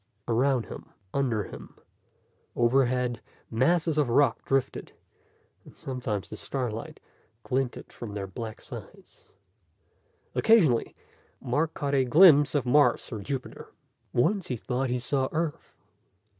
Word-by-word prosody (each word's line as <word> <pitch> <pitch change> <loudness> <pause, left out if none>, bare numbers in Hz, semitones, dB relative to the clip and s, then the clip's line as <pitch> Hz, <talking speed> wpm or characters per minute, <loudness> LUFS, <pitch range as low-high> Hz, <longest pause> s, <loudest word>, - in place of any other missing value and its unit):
Around 125 +1 +2
him, - - -10 0.2
under 120 -6 0
him, - - -11 0.8
overhead, 125 0 +1 0.3
masses 155 +6 +2
of 145 -5 +1
rock 125 0 +3
drifted, 135 -1 -1 0.7
and - - -17
sometimes 125 -7 -4
the - - -6
starlight 120 -5 -4 0.4
glinted 130 -1 -3
from 105 -4 -8
their 100 -1 -3
black 110 +3 -7
sides. - - -12 1.0
Occasionally, 175 - +3 0.4
Mark 150 +6 -1
caught 140 -1 -2
a 135 -1 +4
glimpse 150 +1 +6
of 140 -3 +1
Mars 145 +3 +3
or 110 - -4
Jupiter. 130 +5 -6 0.4
Once 185 - +1
he 125 - -3
thought 130 +3 -2
he 125 - 0
saw 130 +2 -1
Earth. 160 -1 -3
130 Hz, 120 wpm, -27 LUFS, 120-145 Hz, 1.0 s, glimpse